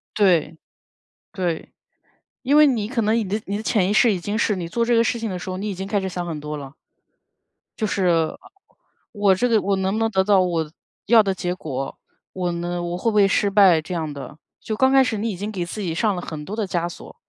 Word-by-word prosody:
对， 170 -6 +2 0.8
对。 175 -5 -3 0.7
因 275 +3 +2
为 300 0 +8
你 225 -7 0
可 235 -1 -1
能 215 +1 +2
你 230 - +2
的 210 +3 -1
你 200 - -3
的 - - -5
潜 210 -4 +1
意 - - +1
识， 215 +1 +4
已 190 - -1
经 205 +4 -3
是 215 -3 +1
你 175 -2 -4
做 235 +8 -2
这 240 0 +2
个 230 - +4
事 235 0 -1
情 225 - -2
的 185 -3 -4
时 180 - -6
候， 185 - -4
你 210 - -3
已 200 - -3
经 190 +2 -5
开 205 0 0
始 190 - -3
想 175 -1 -4
很 160 -3 -5
多 150 +1 -5
了。 140 -1 -8 1.1
就 215 - 0
是 170 -5 +1 0.8
我 205 -3 +3
这 245 +6 +1
个 225 -3 +3
我 200 0 0
能 190 0 0
不 215 - -1
能 225 0 +1
得 190 -2 +2
到 200 -2 +4
我 165 -4 -1 0.4
要 225 0 +6
的 195 -2 -1
结 180 -1 -3
果？ 135 -6 -5 0.3
我 180 -2 -2
呢， 175 +1 -3
我 175 0 -3
会 230 - +1
不 - - -5
会 205 -1 +5
失 200 +1 +2
败 195 -5 +6
这 160 +3 -6
样 160 -3 -3
的？ 140 +1 -9 0.2
就 220 - -4
刚 265 +3 +3
开 270 0 +6
始 225 -4 -2
你 220 +3 -1
已 190 - -5
经 205 +3 -4
给 185 -4 -3
自 210 - -6
己 175 -5 -2
上 210 +4 +1
了 175 - -5
很 150 -2 -6
多 200 - -6
的 220 -3 -1
枷 175 -2 -1
锁， 175 - -11
190 Hz, 275 characters per minute, -22 LUFS, 175-215 Hz, 1.1 s, 为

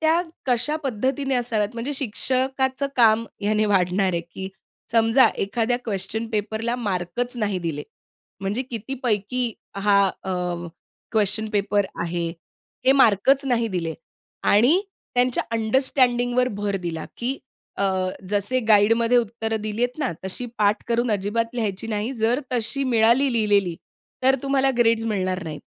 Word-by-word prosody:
त्या 320 +2 +3 0.3
कशा 255 +5 +1
पद्धतीने 265 +3 -1
असाव्यात, 230 -4 0
म्हणजे 235 +5 -3
शिक्षकाचं 265 +2 0
काम 230 -1 +5 0.2
ह्याने 215 +1 +1
वाढणार 190 -1 +2
आहे, 170 - 0
की 175 +3 -8 0.4
समजा 230 +3 +5
एखाद्या 230 +4 0
क्वेशन 215 +2 -3
पेपरला 220 +3 -1
मार्कच 210 +3 -2
नाही 205 -4 -1
दिले, 160 -4 -3 0.6
म्हणजे 200 +6 -1
किती 230 +3 -4
पैकी 235 +1 0 0.2
हा 200 0 +4 0.2
अ, 190 - -4 0.8
क्वेशन 215 0 +1
पेपर 205 -1 +1 0.2
आहे 170 0 -2 0.6
हे 265 - +7
मार्कच 265 +7 +4
नाही 235 -3 +1
दिले 165 -4 -3 0.5
आणि 245 - +5 0.3
त्यांच्या 245 0 +2
अंडरस्टँडिंगवर 245 +1 +2
भर 205 -2 -2
दिला, 165 -2 -4
की 255 +3 -2 0.4
अ, - - -1 0.5
जसे 205 +5 +1
गाईडमध्ये 230 +3 +5
उत्तर 225 -1 -2
दिलीये 215 +3 -1
ना, 280 - -1
तशी 190 +6 -4
पाठ 210 +1 +2
करून 235 0 +1
अजिबात 230 +4 -1
लिहायची 215 -3 -2
नाही 215 +3 -2
जर 230 +3 +1
तशी 250 +3 -1
मिळाली 245 +2 +4
लिहिलेली, 205 -6 +2 0.5
तर 265 +1 +5
तुम्हाला 275 -1 +2
ग्रेड्स 230 -1 +3
मिळणार 185 -4 -1
नाहीत. 155 -2 -6
225 Hz, 135 wpm, -23 LUFS, 205-250 Hz, 0.8 s, हे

